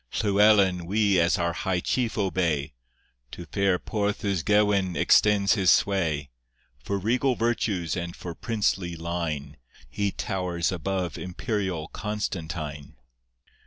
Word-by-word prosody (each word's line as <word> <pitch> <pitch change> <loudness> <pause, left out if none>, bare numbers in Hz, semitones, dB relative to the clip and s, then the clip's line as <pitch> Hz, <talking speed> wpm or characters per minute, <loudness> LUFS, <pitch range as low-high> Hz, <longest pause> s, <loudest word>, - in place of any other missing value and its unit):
Llywelyn 100 -4 +3
we 100 -1 +2
as 85 +1 +3
our 85 -1 0
high 90 0 -1
chief 120 +5 -1
obey, 85 -9 0 0.6
To 85 - -7
fair 100 +2 +1
Porth 105 +1 -2
Ysgewin 100 0 +2
extends 100 -2 +4
his 95 -5 +2
sway; 80 -8 +2 0.5
For 100 - -2
regal 125 +6 +1
virtues 105 -8 -1
and 85 -1 -4
for 85 - -7
princely 100 -5 -1
line 80 -4 -4 0.3
He 100 +10 0
towers 90 -5 -2
above 90 -2 -3
imperial 95 -4 -3
Constantine. 80 -8 -5
95 Hz, 115 wpm, -26 LUFS, 85-105 Hz, 0.6 s, extends